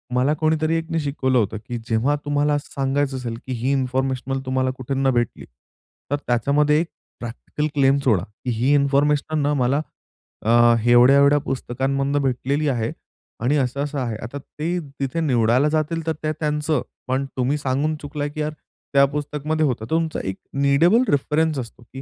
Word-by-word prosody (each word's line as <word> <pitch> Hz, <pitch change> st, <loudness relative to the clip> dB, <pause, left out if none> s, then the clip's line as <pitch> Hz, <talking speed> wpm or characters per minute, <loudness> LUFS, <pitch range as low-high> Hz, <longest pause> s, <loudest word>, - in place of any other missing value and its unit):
मला 130 Hz, +4 st, +3 dB
कोणीतरी 155 Hz, 0 st, +1 dB
एकने 165 Hz, 0 st, -2 dB
शिकवलं 135 Hz, -3 st, 0 dB
होतं 110 Hz, -2 st, 0 dB
की 120 Hz, -, -3 dB
जेव्हा 120 Hz, +6 st, +2 dB
तुम्हाला 145 Hz, 0 st, +1 dB
सांगायचं 135 Hz, 0 st, -1 dB
असेल, 120 Hz, -3 st, -4 dB
की -, -, -4 dB
ही 125 Hz, +3 st, -1 dB
इन्फॉर्मेशन 130 Hz, 0 st, -1 dB
तुम्हाला 130 Hz, 0 st, 0 dB
कुठूनन 135 Hz, +1 st, 0 dB
भेटली, 120 Hz, -2 st, -1 dB, 0.7 s
तर -, -, +3 dB
त्याच्यामध्ये 145 Hz, +5 st, +3 dB
एक 170 Hz, -, -3 dB, 0.3 s
प्रॅक्टिकल 120 Hz, +5 st, -4 dB
क्लेम 135 Hz, -1 st, +4 dB
सोडा. 110 Hz, -10 st, +3 dB, 0.2 s
ही 125 Hz, +4 st, +2 dB
इन्फॉर्मेशन 145 Hz, +2 st, +2 dB
न -, -, +2 dB
मला 135 Hz, +4 st, +2 dB, 0.6 s
अ, 120 Hz, +1 st, +5 dB
एवढ्या-एवढ्या 140 Hz, +4 st, +6 dB
पुस्तकांमधून 135 Hz, +1 st, -1 dB
भेटलेली 135 Hz, +3 st, 0 dB
आहे 115 Hz, -4 st, -1 dB, 0.5 s
आणि 140 Hz, +5 st, +2 dB
असं-असं 140 Hz, +2 st, -1 dB
आहे. 120 Hz, -4 st, -2 dB
आता 120 Hz, +6 st, -6 dB
ते 165 Hz, +5 st, -4 dB, 0.2 s
तिथे 135 Hz, +4 st, -2 dB
निवडायला 125 Hz, -1 st, +3 dB
जातील, 160 Hz, +1 st, -1 dB
तर 160 Hz, -, +2 dB
ते 155 Hz, -, 0 dB
त्यांचं, 150 Hz, 0 st, 0 dB, 0.3 s
पण 130 Hz, +2 st, 0 dB
तुम्ही 130 Hz, +3 st, +1 dB
सांगून 140 Hz, +3 st, 0 dB
चुकला 145 Hz, 0 st, -4 dB
की 150 Hz, +1 st, -5 dB
यार 150 Hz, 0 st, -1 dB, 0.4 s
त्या 140 Hz, 0 st, +6 dB
पुस्तकमध्ये 150 Hz, +1 st, -1 dB
होतं. 130 Hz, -5 st, 0 dB
तर -, -, -15 dB
तुमचा 160 Hz, -1 st, 0 dB
एक 95 Hz, -, -5 dB, 0.3 s
नीडेबल 170 Hz, -, +4 dB
रेफरन्स 150 Hz, +1 st, +1 dB
असतो 120 Hz, -1 st, -8 dB
की 135 Hz, -, -7 dB
140 Hz, 160 wpm, -22 LUFS, 125-150 Hz, 0.7 s, एवढ्या-एवढ्या